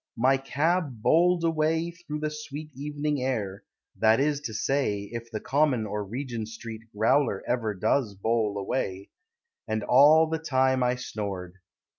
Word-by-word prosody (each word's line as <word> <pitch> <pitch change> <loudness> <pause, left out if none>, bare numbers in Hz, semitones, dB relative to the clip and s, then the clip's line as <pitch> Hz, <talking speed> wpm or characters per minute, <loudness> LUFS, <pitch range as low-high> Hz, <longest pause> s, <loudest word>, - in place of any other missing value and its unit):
My 130 +4 +4
cab 145 -2 -1
Bowled 170 +6 +4
away 160 +1 +1
Through 165 -3 -7
the 155 0 -1
sweet 150 0 -7
evening 145 0 -2
air 105 -7 -2 0.3
(That 110 +2 +4
is 145 0 +1
to 120 -7 -5
say, 105 -7 0
If 115 0 -6
the 110 -2 -4
common 135 -5 +1
or 105 0 -3
Regent 120 +1 -5
Street 115 0 -8
growler 115 0 +2
Ever 115 -4 -1
does 110 +2 0
bowl 110 0 0
away), 100 -2 -3 0.6
And 110 -1 -1
all 145 +8 +6
the 160 0 -2
time 130 -4 +2
I 125 0 +2
snored. 100 -7 -5
130 Hz, 150 wpm, -27 LUFS, 110-150 Hz, 0.6 s, all